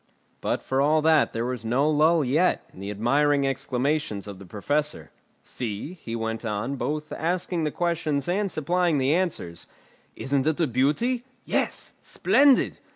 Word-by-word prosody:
But - - -1
for 130 +1 0
all 155 +2 +3
that 160 -1 +4
there 115 +1 -2
was 125 -2 -4
no 125 +6 +1
lull 155 +1 +3
yet 155 +9 +1
in - - -14
the 100 +1 -5
admiring 140 +7 +2
exclamations 135 -4 -1
of 100 -2 -8
the 100 - -12
Professor. 145 - -2 0.3
"See," 115 - -5
he 115 - -5
went 115 0 -3
on, 115 +4 -2
both 150 +3 -3
asking 175 0 -1
the - - +1
questions 155 -5 -1
and 200 +3 0
supplying 170 +1 +1
the 135 +2 +2
answers. 160 - -2 0.5
"Isn't 135 +1 0
it 155 +1 +1
a 165 - +3
beauty? 150 - +1 0.2
Yes; - - -1
splendid! 280 -2 +3
145 Hz, 155 wpm, -25 LUFS, 120-160 Hz, 0.5 s, that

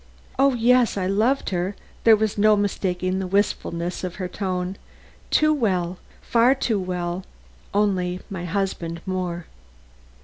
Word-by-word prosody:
"O 275 -1 +4
yes, 240 -1 +3
I 185 - 0
loved 220 +9 +1
her." 185 +2 -1 0.3
There 225 -1 +8
was 215 -1 0
no 215 +1 +5
mistaking 185 -2 -1
the 190 - -2
wistfulness 180 -3 -1
of 185 -1 -4
her 185 -3 -3
tone. 185 0 -3 0.5
"Too 310 0 +4
well, 185 - 0 0.2
far 240 +3 +4
too 230 -6 0
well; 180 0 -3 0.5
only 185 -3 +1
my 180 -3 -5
husband 175 -3 -2
more." 180 -3 -3
190 Hz, 135 wpm, -23 LUFS, 180-215 Hz, 0.5 s, There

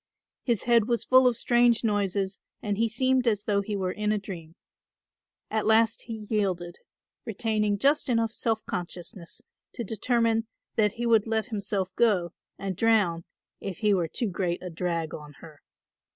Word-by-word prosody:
His 235 -5 0
head 235 -3 +4
was 235 -2 0
full 255 0 +6
of 240 -2 +2
strange 240 -1 +3
noises 200 -2 0 0.2
and 205 -1 -2
he 230 0 +2
seemed 255 +2 +1
as 210 -3 +2
though 205 -2 +1
he 205 +1 -4
were 185 -2 -1
in 210 +2 -1
a 215 - +2
dream. 175 -5 -8 1.0
At 220 0 0
last 225 +1 +3
he 220 -2 -6
yielded, 185 -5 -1 0.4
retaining 215 -2 0
just 280 +5 +2
enough 230 -2 +2
self 225 -2 -1
consciousness 175 0 -6 0.3
to 240 - -3
determine 225 +1 +1 0.3
that 210 -2 +2
he 240 - -3
would 225 -2 +4
let 220 -1 -1
himself 200 -2 -1
go, 190 -7 +2 0.2
and 195 -1 -4
drown, 200 -6 +2 0.3
if 195 -3 -5
he 210 -2 +2
were 175 -4 +1
too 215 +5 -3
great 175 -1 -2
a 180 - -5
drag 165 -1 -2
on 150 -1 -9
her. 150 0 -14
210 Hz, 165 wpm, -27 LUFS, 185-230 Hz, 1.0 s, full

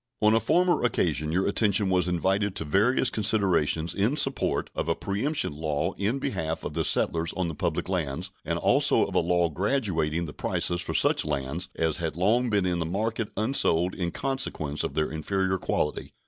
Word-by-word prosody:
On 105 0 +4
a 115 - +4
former 175 - +2
occasion 75 - 0
your 95 +3 +1
attention 100 -1 +2
was 90 0 +2
invited 95 +3 0
to 80 - -2
various 115 - +2
considerations 95 -6 +1
in 110 +11 +1
support 135 -2 0
of - - -3
a 85 - +2
preemption 105 - -1
law 75 -1 -2
in 105 +7 -1
behalf 80 - -3
of 75 - -5
the 80 +1 -1
settlers 80 +3 +1
on 90 -2 -2
the - - -5
public - - -2
lands, 80 -8 -3
and - - -2
also - - +3
of - - -7
a - - +3
law 90 -1 +2
graduating 85 - -1
the 75 - -8
prices 85 0 0
for - - -4
such - - +3
lands 70 +6 -3
as 80 -2 0
had 80 -3 -3
long 115 +7 +2
been 100 -3 +1
in 90 -1 0
the - - 0
market 110 +4 -2
unsold 95 -6 +2
in 90 -3 -2
consequence 85 - -2
of - - -4
their 80 0 0
inferior 95 +4 -1
quality. 75 - -2
90 Hz, 190 wpm, -26 LUFS, 80-105 Hz, -, On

